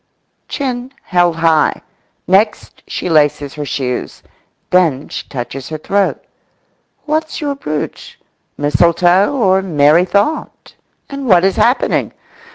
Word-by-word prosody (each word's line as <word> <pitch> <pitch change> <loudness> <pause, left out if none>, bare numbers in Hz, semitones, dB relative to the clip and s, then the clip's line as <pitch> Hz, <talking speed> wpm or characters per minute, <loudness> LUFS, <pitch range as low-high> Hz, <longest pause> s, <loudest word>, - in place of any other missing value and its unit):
Chin 255 -2 -4
held 175 -2 +2
high. 165 -2 +2 0.5
Next 205 +4 +1
she - - -4
laces 145 -3 +2
her 150 -1 -5
shoes. 125 -3 -4 0.5
Then 165 -7 +2
she - - -6
touches 130 0 -6
her 155 - -4
throat. 195 +5 -1 0.8
What's 310 +1 -2
your 290 -2 -2
brooch? 155 - -6 0.4
Mistletoe 175 +6 +3
or 190 -8 +2
merry 160 -1 +3
thought? 205 - -2 0.3
And 275 -1 -6
what 185 -4 +5
is 195 - +1
happening? 245 +3 +1
180 Hz, 115 wpm, -15 LUFS, 150-215 Hz, 0.8 s, what